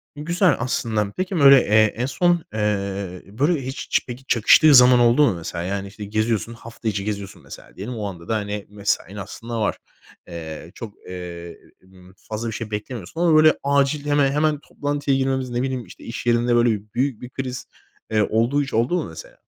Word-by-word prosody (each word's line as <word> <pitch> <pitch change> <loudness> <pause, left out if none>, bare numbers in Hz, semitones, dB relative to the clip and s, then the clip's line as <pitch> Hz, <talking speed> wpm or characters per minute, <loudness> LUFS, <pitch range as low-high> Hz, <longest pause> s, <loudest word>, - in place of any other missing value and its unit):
Güzel 175 +5 +2
aslında. 110 -4 -1
Peki 185 +1 -2
böyle, 140 -1 +9
eee, 110 0 +4
en 125 - 0
son, 175 +4 +1
eee, 100 -3 -2
böyle 140 - 0
hiç 130 - -6
ç - - +2 0.2
çakıştığı 140 +6 +6
zaman 125 -1 +8
oldu 120 +4 +4
mu 100 - 0
mesela? 85 0 -5
Yani 100 +2 -3
işte 105 +1 -9
geziyorsun, 110 +2 -1
hafta 115 0 -9
içi 100 -2 -1
geziyorsun 100 -2 -5
mesela - - -13
diyelim. 110 +6 -6
O 105 -2 -4
anda 85 -4 -9
da 110 - 0
hani 105 -1 -3
mesain 100 -1 -2
aslında 115 +3 -6
var. - - 0 0.5
Eee, 80 -1 -8
çok, 110 -3 -8 0.2
eee, 85 -2 -8 0.2
m 95 0 -19 0.2
fazla 110 +2 -3
bir 110 - -4
şey 110 0 -6
beklemiyorsun 110 - -5
ama 170 -3 +4
böyle 155 0 +6
acil 140 +1 +1
heme 145 -2 +2
hemen 150 0 +1
toplantıya 145 -2 -2
girmemiz, 130 -1 -1
ne 120 0 -2
bileyim 130 -2 -3
işte 90 - -14
iş 115 - -7
yerinde 120 0 +2
böyle 120 0 +4 0.3
büyük 130 -1 -1
bir 125 - -8
kriz, 130 -1 -5 0.5
eee, 110 -1 +3
olduğu 120 +6 +2
hiç 140 - -8
oldu 120 +9 +1
mu 170 - -2
mesela? 80 - -12
115 Hz, 185 wpm, -22 LUFS, 100-135 Hz, 0.5 s, böyle